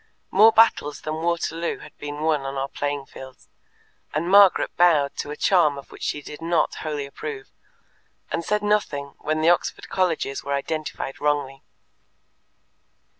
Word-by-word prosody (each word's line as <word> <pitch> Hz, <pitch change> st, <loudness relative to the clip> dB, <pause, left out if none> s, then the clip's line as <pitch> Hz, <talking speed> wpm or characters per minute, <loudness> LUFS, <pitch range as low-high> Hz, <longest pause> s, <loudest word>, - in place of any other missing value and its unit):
More 215 Hz, +4 st, +7 dB
battles 220 Hz, -10 st, +3 dB
than 155 Hz, +1 st, -4 dB
Waterloo 170 Hz, 0 st, -1 dB
have -, -, -14 dB
been 145 Hz, 0 st, -6 dB
won 155 Hz, -2 st, +1 dB
on 135 Hz, 0 st, -5 dB
our 135 Hz, 0 st, -2 dB
playing 145 Hz, 0 st, -3 dB
fields, 130 Hz, -1 st, -13 dB, 0.7 s
and 160 Hz, +3 st, -1 dB
Margaret 200 Hz, -1 st, +5 dB
bowed 160 Hz, -5 st, +3 dB
to -, -, -4 dB
a 150 Hz, -, -4 dB
charm 160 Hz, -7 st, +3 dB
of 140 Hz, -, -11 dB
which -, -, -13 dB
she 145 Hz, -, -3 dB
did 150 Hz, -, -10 dB
not 170 Hz, 0 st, +1 dB
wholly 150 Hz, -3 st, -3 dB
approve, 410 Hz, -, -8 dB, 0.8 s
and 170 Hz, -, -1 dB
said 210 Hz, +4 st, -1 dB
nothing 150 Hz, -10 st, 0 dB
when 155 Hz, +1 st, -1 dB
the 160 Hz, -, +4 dB
Oxford 175 Hz, -, 0 dB
colleges 165 Hz, -7 st, -1 dB
were 140 Hz, 0 st, -1 dB
identified 150 Hz, -1 st, -4 dB
wrongly. 145 Hz, -2 st, -1 dB
155 Hz, 155 wpm, -23 LUFS, 140-175 Hz, 0.8 s, More